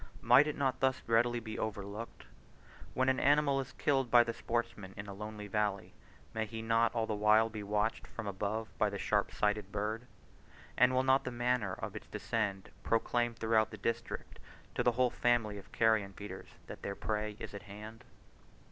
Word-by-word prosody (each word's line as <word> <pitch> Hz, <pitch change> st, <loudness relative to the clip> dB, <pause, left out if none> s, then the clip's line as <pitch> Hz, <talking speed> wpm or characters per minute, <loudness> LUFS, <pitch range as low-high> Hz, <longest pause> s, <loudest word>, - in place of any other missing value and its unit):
Might 125 Hz, +6 st, +7 dB
it 150 Hz, -, -3 dB
not 130 Hz, -2 st, 0 dB
thus 130 Hz, 0 st, +2 dB
readily 120 Hz, +1 st, +3 dB
be 110 Hz, -1 st, -6 dB
overlooked? 105 Hz, +1 st, -5 dB, 0.7 s
When 130 Hz, 0 st, +2 dB
an 130 Hz, 0 st, +3 dB
animal 145 Hz, 0 st, +4 dB
is 130 Hz, -, -9 dB
killed 135 Hz, -4 st, +1 dB
by 120 Hz, 0 st, +7 dB
the 115 Hz, 0 st, -3 dB
sportsman 115 Hz, -5 st, -3 dB
in 100 Hz, -, -5 dB
a 100 Hz, -, -7 dB
lonely 105 Hz, +1 st, -7 dB
valley, 105 Hz, -1 st, -1 dB, 0.4 s
may 110 Hz, -1 st, -1 dB
he 110 Hz, 0 st, -6 dB
not 115 Hz, +1 st, +2 dB
all 115 Hz, -1 st, +1 dB
the 110 Hz, -, -2 dB
while 105 Hz, +2 st, +4 dB
be 110 Hz, -1 st, -5 dB
watched 105 Hz, +2 st, -1 dB
from 120 Hz, -, -7 dB
above 105 Hz, +3 st, -3 dB
by 105 Hz, -, +3 dB
the 100 Hz, -, -4 dB
sharp -, -, +1 dB
sighted 105 Hz, -1 st, 0 dB
bird? 110 Hz, +4 st, -3 dB, 0.7 s
And 125 Hz, +1 st, +5 dB
will 130 Hz, -, +3 dB
not 135 Hz, +1 st, +4 dB
the 130 Hz, -, -3 dB
manner 120 Hz, -5 st, 0 dB
of -, -, -6 dB
its -, -, -8 dB
descend 100 Hz, -4 st, -2 dB
proclaim 120 Hz, +1 st, +1 dB
throughout 110 Hz, -1 st, +2 dB
the 110 Hz, -, -8 dB
district 115 Hz, +3 st, -4 dB, 0.3 s
to -, -, 0 dB
the 120 Hz, -, +3 dB
whole 125 Hz, 0 st, +2 dB
family 115 Hz, -4 st, +1 dB
of 95 Hz, -, -16 dB
carrion 110 Hz, -3 st, +2 dB
feeders, 100 Hz, -2 st, -8 dB, 0.2 s
that -, -, -9 dB
their 100 Hz, -, -4 dB
prey 105 Hz, 0 st, -2 dB
is -, -, -7 dB
at 100 Hz, -, -6 dB
hand? 110 Hz, +2 st, -9 dB
110 Hz, 190 wpm, -33 LUFS, 105-120 Hz, 0.7 s, Might